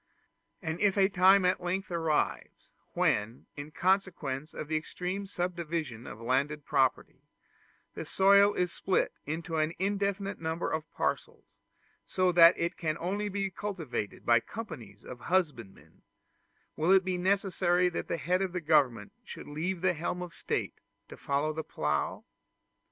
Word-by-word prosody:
And 160 0 -3
if 205 -1 +2
a 195 -1 +5
time 190 0 +5
at 180 +1 +2
length 185 +2 -3
arrives, 165 -3 -1 0.2
when, 110 +4 0
in 145 +1 -7
consequence 165 -6 -1
of 155 - -6
the 155 - -1
extreme 180 +5 -3
subdivision 170 - -4
of 105 - -9
landed 140 +5 -1
property, 135 -3 0 0.7
the - - -5
soil 200 +1 +5
is 180 -1 0
split 190 - 0
into 160 +2 -3
an 155 +1 +1
infinite 200 0 -1
number 160 +1 -2
of 160 0 -3
parcels, - - -4 0.5
so 185 -1 +2
that 170 0 +7
it 170 +1 -2
can 155 -2 -2
only 200 +5 -2
be 195 -1 -2
cultivated 175 - -5
by 120 0 +5
companies 115 - -9
of 125 - -9
husbandmen, 145 - -2 0.7
will 160 +4 +1
it 190 -1 +5
be 185 -1 -1
necessary 180 -2 +2
that 175 - -3
the - - -2
head 180 +4 0
of 190 -2 -2
the 180 - -1
government 140 -10 +2
should - - -10
leave 170 +5 -3
the 185 0 +2
helm 175 +2 -3
of 175 -1 -9
state - - -3 0.3
to - - -9
follow 145 +2 -1
the 160 +1 -4
plough? 75 - -2
170 Hz, 150 wpm, -30 LUFS, 150-190 Hz, 0.7 s, that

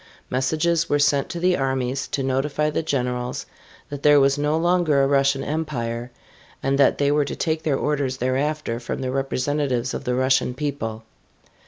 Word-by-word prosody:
Messages 160 +6 +1
were 145 - +3
sent 145 -1 +2
to 170 - -4
the 180 +1 +3
armies 135 -1 -1
to 135 - -2
notify 140 +3 0
the - - -1
generals 125 -4 -2 0.4
that 145 -1 -6
there 145 0 +6
was 135 0 +4
no 150 +2 0
longer 170 -4 +2
a - - +3
Russian 135 -1 +2
Empire 125 -7 -3 0.5
and 135 +1 +1
that 140 - +4
they 140 0 +2
were 145 0 +2
to - - -5
take 160 -1 -1
their 145 -4 0
orders 140 -3 -1
thereafter 130 0 -1
from 120 - -5
the 130 -1 -2
representatives 135 -1 -1
of - - -4
the 125 - -1
Russian 130 -1 +2
people. 130 -7 -4
140 Hz, 175 wpm, -23 LUFS, 130-150 Hz, 0.5 s, there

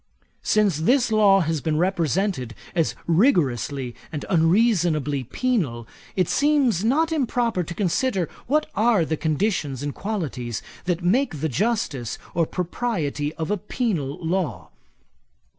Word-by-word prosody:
'Since 205 -7 +2
this 245 - +3
law 205 -3 +5
has 160 -2 -1
been 155 -2 0
represented 175 - 0 0.2
as 165 -3 0
rigorously 145 - +1 0.2
and 150 - -5
unreasonably 165 - +2
penal, 135 - -1 0.3
it 185 -3 +2
seems 280 - +2
not 310 +8 +2
improper 245 - 0
to 170 0 -6
consider 195 -1 0 0.2
what 300 +4 +2
are 215 -5 +3
the 160 - -1
conditions 155 - -1
and 145 -1 -3
qualities 145 - -4 0.2
that 180 -1 -1
make 195 - +1
the 160 +2 -1
justice 150 - -1 0.2
or 165 -2 +1
propriety 165 -6 -2
of 160 +4 -3
a 210 - +1
penal 180 - -2
law. 155 - -2
175 Hz, 125 wpm, -23 LUFS, 150-220 Hz, 0.3 s, law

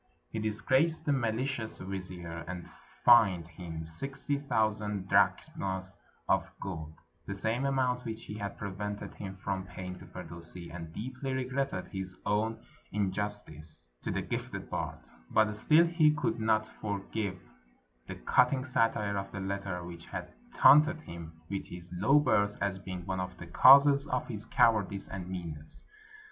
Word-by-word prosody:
He 110 - -3
disgraced 130 +9 +2
the 145 - +3
malicious 120 -1 -1
vizier, 90 -3 -6
and 90 -1 -6 0.4
fined 100 -9 +7
him 80 -1 -7
sixty 140 - -3
thousand 105 -6 0
drachms 95 0 +1 0.3
of - - +2
gold, 80 -5 -6 0.3
the 100 - -3
same 115 +7 0
amount 130 -2 +1
which 110 -2 -6
he - - -6
had 100 -1 -5
prevented 105 +1 -5
him 95 -1 -7
from 95 0 -3
paying 90 0 -7
to 95 - -12
Firdusi, 85 0 -8
and 85 -2 -7
deeply 130 - -4
regretted 130 -5 -2
his 95 -1 -5
own 105 +2 0 0.3
injustice 95 -6 -3 0.2
to - - -4
the - - -1
gifted - - -4
bard; - - -4 0.2
but 105 -1 +3
still 155 +10 +5
he 165 -2 +4
could 160 -1 -1
not 110 -1 +2
forgive 100 -2 -4 0.7
the - - -5
cutting 130 - +3
satire 115 -6 +1
of 100 0 -6
the 100 - -5
letter 95 -2 -3
which 85 -1 -9
had - - -6 0.2
taunted 155 +3 +7
him 85 - -9
with 100 +1 -4
his 90 0 -9
low 100 +11 +4
birth 105 -8 +2
as 95 -1 -1
being 90 -2 -6
one 95 -1 -2
of 90 0 -4
the 85 - -8
causes 140 - +7
of 125 -3 -1
his 110 -3 -6
cowardice 100 -4 +3
and 90 -1 -6
meanness. 80 -4 -7
100 Hz, 150 wpm, -31 LUFS, 90-120 Hz, 0.7 s, fined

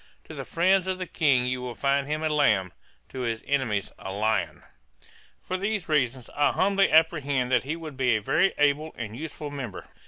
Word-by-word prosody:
To - - -11
the - - -6
friends 185 +2 +2
of 185 -1 -1
the 185 - -4
King 140 -7 +2
you 125 0 -2
will 125 -1 -5
find 140 0 +1
him 155 +1 -2
a 155 - +1
lamb, 105 - +2 0.4
to 130 - -7
his 115 -3 -2
enemies 125 -8 -1
a 95 - -6
lion. 100 -6 -1 0.8
'For 185 - -3
these 200 -1 -2
reasons, 130 -5 0
I 145 0 +3
humbly 195 0 +2
apprehend 145 -5 +2
that 125 0 +2
he 150 +4 -2
would 155 -5 -9
be 125 -4 +2
a - - +1
very 150 - +2
able 145 +2 +1
and 110 -2 -5
useful 150 +1 -6
member. 130 -9 -6
140 Hz, 195 wpm, -26 LUFS, 125-160 Hz, 0.8 s, I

